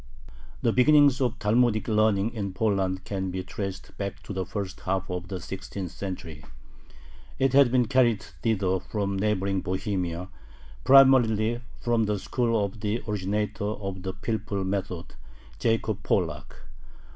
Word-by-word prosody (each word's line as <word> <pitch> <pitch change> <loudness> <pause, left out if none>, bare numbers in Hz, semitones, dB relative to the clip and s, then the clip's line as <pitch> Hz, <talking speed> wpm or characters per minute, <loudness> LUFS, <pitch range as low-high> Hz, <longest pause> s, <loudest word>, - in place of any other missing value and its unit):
The 115 - +3
beginnings 140 0 +5
of 125 -2 0
Talmudic 110 0 +2
learning 110 -1 +2
in 100 -4 -4
Poland 95 -2 0
can 95 -1 -3
be 90 0 -3
traced 95 0 -6
back 100 -3 -4
to 100 - -6
the 95 -1 -3
first 100 -3 -5
half 95 0 -2
of 90 -1 -4
the 95 -1 -4
sixteenth 95 0 -6
century. 85 -6 -7 0.9
It 135 0 +2
had 135 -3 +6
been 125 -1 +3
carried 125 -5 +3 0.2
thither 95 -5 +1
from 100 0 -3
neighboring 100 -2 0
Bohemia, 90 -2 -2 0.5
primarily 120 -4 +5 0.2
from 120 -2 +1
the 105 0 0
school 115 +1 0
of 100 +2 -8
the 105 +2 -2
originator 105 0 -2
of 100 -3 -4
the 95 0 -4
pilpul 100 -1 -3
method, 95 -3 -3 0.5
Jacob 110 -2 0
Pollack. - - -1
100 Hz, 140 wpm, -26 LUFS, 95-115 Hz, 0.9 s, had